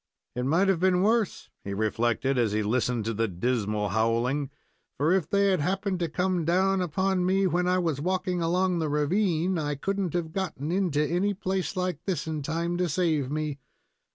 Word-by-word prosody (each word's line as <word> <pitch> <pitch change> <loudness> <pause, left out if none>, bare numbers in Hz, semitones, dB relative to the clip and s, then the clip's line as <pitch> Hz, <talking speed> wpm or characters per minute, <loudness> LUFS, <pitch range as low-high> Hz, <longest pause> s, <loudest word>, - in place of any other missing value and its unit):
"It 125 0 -2
might 170 +7 +3
have 190 -3 +2
been 185 0 +3
worse," 220 -1 0
he 100 0 -4
reflected, 115 +5 0
as 115 -4 +1
he 110 0 +1
listened 120 +1 0
to 115 - -1
the 115 +1 0
dismal 105 +1 -1
howling, 115 +7 0 0.5
"for 155 +5 +2
if 185 -5 0
they 200 0 +3
had 185 - +2
happened 185 +4 -1
to 170 -2 -1
come 180 +1 0
down 190 +3 +2
upon 185 +2 0
me 190 +2 +2
when 180 0 +1
I 180 0 +3
was 165 -6 -1
walking 180 +1 -1
along 180 +1 +1
the 160 -2 -1
ravine, 170 +3 +1
I 145 -1 -2
could 195 +8 -2
n't 185 -5 -1
have 165 -2 -2
gotten 165 -6 -3
into 175 -6 +1
any 190 +5 0
place 190 0 -2
like 180 -4 -2
this 190 -4 -1
in 155 -2 -3
time 170 +4 -2
to 180 -1 0
save 155 -5 0
me. 150 -1 -3
170 Hz, 195 wpm, -27 LUFS, 140-185 Hz, 0.5 s, might